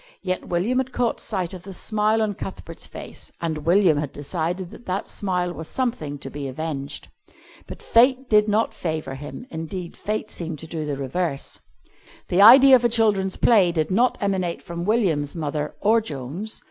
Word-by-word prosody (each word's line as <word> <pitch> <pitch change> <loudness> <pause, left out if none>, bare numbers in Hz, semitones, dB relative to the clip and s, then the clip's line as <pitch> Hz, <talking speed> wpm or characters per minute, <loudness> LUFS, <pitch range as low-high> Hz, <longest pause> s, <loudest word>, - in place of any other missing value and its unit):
Yet 185 -1 -2
William 195 +9 +1
had 260 0 -2
caught 245 -2 0
sight 185 -5 -3
of 185 - -8
the 195 +1 -9
smile 215 +2 +1
on 210 -1 -1
Cuthbert's 175 -3 -8
face - - -9
and 160 -2 -3
William 175 -3 +5
had 145 -2 -3
decided 170 +5 -3
that 240 - -13
that 190 +2 -2
smile 180 -3 -2
was 160 -1 -7
something 225 - -2
to 140 - -9
be 145 -1 -5
avenged. 140 0 -5 0.6
But - - -10
fate 255 +3 +4
did 210 -1 +4
not 215 +2 +1
favour 155 -5 -3
him. 145 - -8
Indeed, 170 +1 -6
fate 215 +1 -3
seemed 165 -2 -4
to 165 - -8
do 160 -1 -4
the 145 -2 -2
reverse. 140 +2 -3 0.7
The 180 +2 +3
idea 260 +5 +10
of 245 - +2
a 240 - +4
children's 210 -5 +2
play 200 -7 +4
did 160 -1 -1
not 235 +6 +3
emanate 190 -4 -1
from 170 0 -5
William's 180 -10 +1
mother, 150 -2 -3
or 225 +2 +4
Joan's. 160 - -5
180 Hz, 180 wpm, -23 LUFS, 155-215 Hz, 0.7 s, idea